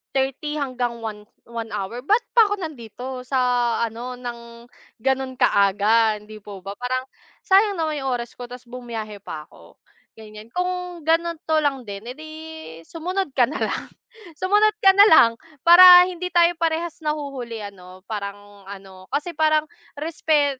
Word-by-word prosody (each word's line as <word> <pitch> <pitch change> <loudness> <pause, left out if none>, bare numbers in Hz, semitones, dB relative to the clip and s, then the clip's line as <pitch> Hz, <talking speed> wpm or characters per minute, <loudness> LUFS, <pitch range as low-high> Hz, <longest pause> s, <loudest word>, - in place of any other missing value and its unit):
30 270 +3 -1
hanggang 250 -3 -2
one 210 -1 -6 0.3
1 230 -1 -6
hour. 215 +6 -4
Ba't 435 +6 +3
pa 450 -4 +5
ako 410 - 0
nandito 255 - -7
sa 265 - 0 0.5
ano 240 +3 -7
ng 235 -1 -9 0.4
ganun 265 0 -1
kaaga, 210 +2 +3
hindi 215 +1 -12
po 200 -2 -10
ba? 200 - -5
Parang 255 +1 -2 0.4
sayang 395 0 +4
naman 310 -3 -2
yung 265 - -1
oras 240 -1 -5
ko 245 - -8
tas 250 0 -11
bumiyahe 225 -5 -7
pa 150 -1 -7
ako - - -19 0.4
ganyan. 215 +1 -12
Kung 360 -1 -3
ganito 330 -1 +1
lang 270 -5 -1
din 200 +1 -7
eh - - -10
di 310 0 -10 0.6
sumunod 360 0 -3
ka 245 -3 +4
na 300 - -7
lang, - - -2 0.5
sumunod 415 +5 +2
ka 385 - +9
na 405 +1 +8
lang 235 - +7 0.3
para 360 +1 +10
hindi 365 0 -5
tayo 345 0 +5
parehas 330 0 -1
nahuhuli 275 -7 -4
ano, 185 -2 -12
parang 205 -1 -7
ano, 190 -1 -11
kasi 300 +4 -2
parang 310 0 +3 0.4
respe 300 -3 0
255 Hz, 155 wpm, -22 LUFS, 220-325 Hz, 0.6 s, para